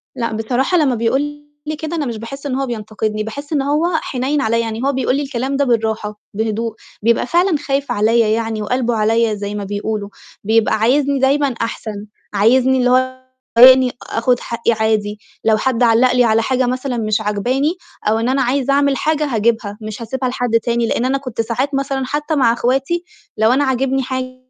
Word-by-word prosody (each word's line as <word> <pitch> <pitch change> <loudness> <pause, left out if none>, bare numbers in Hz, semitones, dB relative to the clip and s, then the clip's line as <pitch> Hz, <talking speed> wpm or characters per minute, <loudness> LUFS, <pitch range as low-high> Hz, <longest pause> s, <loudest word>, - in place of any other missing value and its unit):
لأ، 235 -3 -2
بصراحة 245 +10 0
لمّا 285 -6 +2
بيقول 235 +4 +1 0.4
لي 310 +1 -3
كده 315 +2 -5
أنا 310 -3 -1
مش 235 -3 -4
باحس 275 +6 -8
إن 270 -3 -2
هو 270 +1 -1
بينتقدني، 215 -2 -3
باحس 285 +8 -6
إن 290 - +2
هو 295 +4 +1 0.2
حنيّن 270 +3 -1
عليّا، 230 -2 +1
يعني 225 0 -3
هو 280 - +2
بيقول 260 -1 0
لي 285 - 0
الكلام 270 0 -3
ده 280 - +2
بالراحة، 220 -3 -1
بهدوء، 220 +1 -2 0.3
بيبقى 230 +2 +2
فعلًا 345 +1 +2
خايف 280 -1 -2
عليّا 225 +2 +3
يعني 220 0 -1
وقلبُه 240 +2 0
عليّا 225 +1 +2
زي 205 0 -4
ما 205 - -4
بيقولوا، 205 +1 -3 0.3
بيبقى 220 +1 +2
عايزني 275 +5 +2
دايمًا 280 +2 +3
أحسن، 215 -2 -4 0.3
عايزني 255 +6 +3
اللي 250 -1 +2
هو 260 +1 +1 0.4
إنّي 255 +1 +8 0.2
آخُد 245 +2 +1
حقّي 235 0 -1
عادي. 215 -2 0 0.3
لو 220 -1 +4
حد 250 +2 0
علّق 235 +2 +4
لي 250 0 +4
على 225 -1 +3
حاجة 260 +2 +1
مثلًا 255 0 -2
مش 215 -1 0
عاجباني 250 - 0 0.3
أو 220 +1 +2
إن 230 +2 0
أنا 265 +1 +1
عايزة 265 +2 +1
أعمل 280 -1 +2
حاجة 305 -1 0
هاجيبها، 225 -4 0
مش 215 +1 -7
هاسيبها 255 +3 -2
لحد 245 -2 0
تاني، 235 0 0
لإن 235 - 0
أنا 265 +2 +1
كنت 255 -5 -4
ساعات 250 +5 -2
مثلًا 275 -1 -1
حتى 295 +4 -2
مع 245 -5 +3
إخواتي 270 +8 0 0.3
لو 220 +1 +3
أنا 280 +3 +2
عاجبني 265 0 0
حاجة 255 0 -4
245 Hz, 190 wpm, -18 LUFS, 220-270 Hz, 0.4 s, إنّي